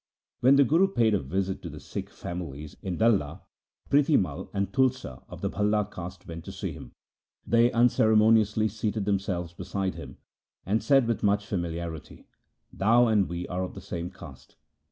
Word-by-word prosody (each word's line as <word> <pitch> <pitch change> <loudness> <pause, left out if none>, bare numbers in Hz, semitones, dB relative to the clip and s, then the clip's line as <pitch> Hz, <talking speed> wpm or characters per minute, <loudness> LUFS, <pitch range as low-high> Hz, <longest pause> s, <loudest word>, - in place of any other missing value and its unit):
When 130 +3 +5
the 140 - +6
Guru 165 +9 +4
paid 115 - +2
a 100 - +2
visit 95 +7 -2
to - - -6
the - - -9
Sikh - - -6
families 80 -4 -7
in 95 -2 -4
Dalla, 105 -10 +1 0.4
Prithi 145 +1 +4
Mai 90 0 -3
and 100 0 -2
Tulsa 130 - 0
of - - -10
the - - -1
Bhalla 105 0 +1
caste 90 +1 -8
went 85 -1 -7
to - - -7
see - - -5
him. - - -11 0.5
They 120 +1 +4
unceremoniously 110 -2 +4
seated 105 0 -2
themselves 95 -4 -1
beside 95 +1 -3
him, - - -10 0.5
and 105 +4 +1
said 135 -3 +4
with 115 - -1
much 105 -1 +2
famili 85 -6 -3
arity, 85 -2 -7 0.3
' - - -46
Thou 115 +5 +5
and 105 -5 +2
we 85 +1 -4
are 90 +1 -3
of 90 - -6
the - - -7
same 85 0 -5
caste.' 70 -8 -13
100 Hz, 180 wpm, -27 LUFS, 90-115 Hz, 0.5 s, the